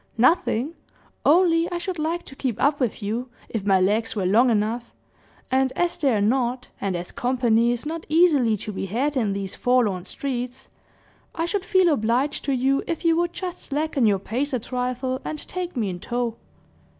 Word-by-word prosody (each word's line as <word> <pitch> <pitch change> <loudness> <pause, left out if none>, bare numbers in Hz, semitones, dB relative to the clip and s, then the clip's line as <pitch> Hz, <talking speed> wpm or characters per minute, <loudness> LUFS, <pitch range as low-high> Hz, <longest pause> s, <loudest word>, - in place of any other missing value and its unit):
"Nothing; 260 +1 +2 0.5
only 335 +1 +4
I 350 - -1
should 345 0 -4
like 330 +3 -1
to 270 - -12
keep 255 -5 -2
up 285 +1 +2
with 240 -4 -1
you, 230 +5 -2 0.2
if 220 -4 -3
my 195 -2 +4
legs 215 +5 +1
were 195 -3 -1
long 225 +7 +4
enough; 225 +2 0 0.6
and 260 0 +2
as 350 -1 0
they're 265 -9 +2
not, 250 +2 0
and 195 -2 -1
as 175 0 -5
company 240 -2 +2
is 245 +3 -3
not 320 +1 -5
easily 300 -9 +4
to 210 - -5
be 195 -1 -4
had 265 +9 -1
in 220 -6 +1
these 195 -1 -4
forlorn 220 -8 +1
streets, 250 0 -4 0.7
I 330 - 0
should 385 +2 -1
feel 370 -4 +4
obliged 255 +4 0
to 280 - 0
you 270 +2 +2
if 335 -1 -3
you 330 -1 +5
would 345 0 +1
just 360 -1 -5
slacken 290 -4 0
your 200 -2 +3
pace 250 +9 -3
a 255 - +1
trifle, 255 +2 -2
and 310 - -4
take 360 -5 -4
me 220 -4 0
in 175 - -6
tow." 240 +2 -2
255 Hz, 185 wpm, -24 LUFS, 225-305 Hz, 0.7 s, you